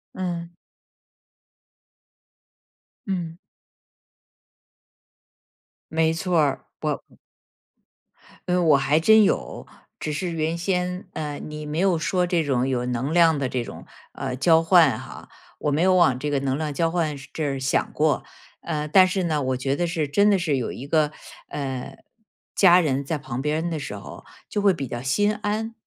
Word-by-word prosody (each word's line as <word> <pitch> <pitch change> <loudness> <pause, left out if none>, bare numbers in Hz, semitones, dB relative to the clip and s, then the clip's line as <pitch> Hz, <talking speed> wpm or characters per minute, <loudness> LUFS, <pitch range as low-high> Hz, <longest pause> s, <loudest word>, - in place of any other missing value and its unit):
嗯。 175 -2 -4 2.5
嗯。 175 -4 -3 2.5
没 160 0 +2
错 170 +1 0
儿， 145 -3 0 0.2
我 - - -1 1.5
嗯， 180 -1 +2
我 150 -3 +6
还 140 +3 +2
真 220 +5 +6
有， - - -1 0.4
只 155 - -2
是 175 +5 -2
原 165 0 -1
先， 180 +1 -2
呃， 150 -2 -4
你 150 0 -7
没 150 +2 -3
有 185 -2 +3
说 180 +2 0
这 175 -2 +1
种 130 -3 0
有 125 -2 -1
能 125 +4 -2
量 165 -3 +4
的 135 - 0
这 125 -1 -2
种， - - -10 0.3
呃， 125 - -4
交 160 +4 +4
换 165 -8 +5
哈， - - -11 0.3
我 150 - -1
没 150 - +1
有 185 +1 +4
往 160 -9 +4
这 145 +3 -2
个 140 -2 0
能 135 -1 -1
量 150 -2 -3
交 165 +3 0
换 165 -4 -1 0.2
这 - - -5
儿 140 -1 -1
想 135 +1 0
过。 150 -1 +1 0.4
呃， 150 -3 -3
但 185 +4 +6
是 185 0 -1
呢， 155 -3 0
我 130 -1 -1
觉 135 +2 -1
得 175 -1 0
是 155 -4 -2
真 200 +7 +4
的 200 - +4
是 160 -6 0
有 125 - -3
一 130 - -8
个， 150 0 +1 0.3
呃， 135 -3 -5 0.6
家 180 -2 +6
人 140 -3 -1
在 155 +3 -2
旁 130 -3 -5
边 155 +4 -1
的 160 -2 -3
时 105 -7 -6
候 100 - -10 0.2
就 205 - -1
会 200 -2 +4
比 140 -6 -5
较 120 - -4
心 205 +11 +1
安。 215 +2 -3
160 Hz, 175 characters per minute, -24 LUFS, 140-175 Hz, 2.5 s, 我